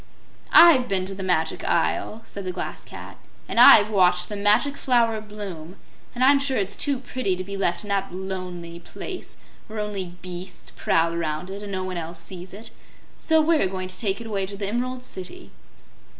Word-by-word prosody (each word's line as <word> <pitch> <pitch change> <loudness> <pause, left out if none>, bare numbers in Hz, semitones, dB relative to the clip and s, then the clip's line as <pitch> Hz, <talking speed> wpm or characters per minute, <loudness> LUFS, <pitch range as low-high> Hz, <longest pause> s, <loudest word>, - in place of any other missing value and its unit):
"I've 310 -7 +8
been 190 -2 0
to 195 - -3
the 195 - -7
Magic 170 -4 0
Isle," 225 +1 0
said 200 - -8
the 185 - -3
Glass 180 - -6
Cat, - - -11 0.3
"and - - -1
I've 210 0 +9
watched 180 -3 +3
the 210 - -4
Magic 210 +8 +3
Flower 230 -5 +1
bloom, 195 -5 -8 0.4
and 250 - 0
I'm 275 +1 +6
sure 275 -1 0
it's 200 0 -1
too 280 -2 0
pretty 245 -6 -2
to 185 - -5
be 200 +1 -7
left 195 -1 0
in 205 - -9
that 195 -1 -1
lonely 180 -2 -6
place 200 - -8 0.3
where 220 - -8
only 195 -4 -4
beasts 180 0 -8
prowl 165 +1 +1
around 170 +2 -3
it 200 +1 -7
and 205 -1 -7
no 185 -1 -3
else 170 -1 -6
sees 180 +1 -9
it. 210 +5 -10 0.5
So 320 -1 +3
we're 315 - +3
going 185 0 -5
to 185 - -3
take 200 -2 -1
it 230 - -8
away 200 -3 -2
to 200 +1 -8
the 200 -1 -3
Emerald 250 +3 -3
City." 190 - -7
195 Hz, 195 wpm, -24 LUFS, 180-225 Hz, 0.5 s, I've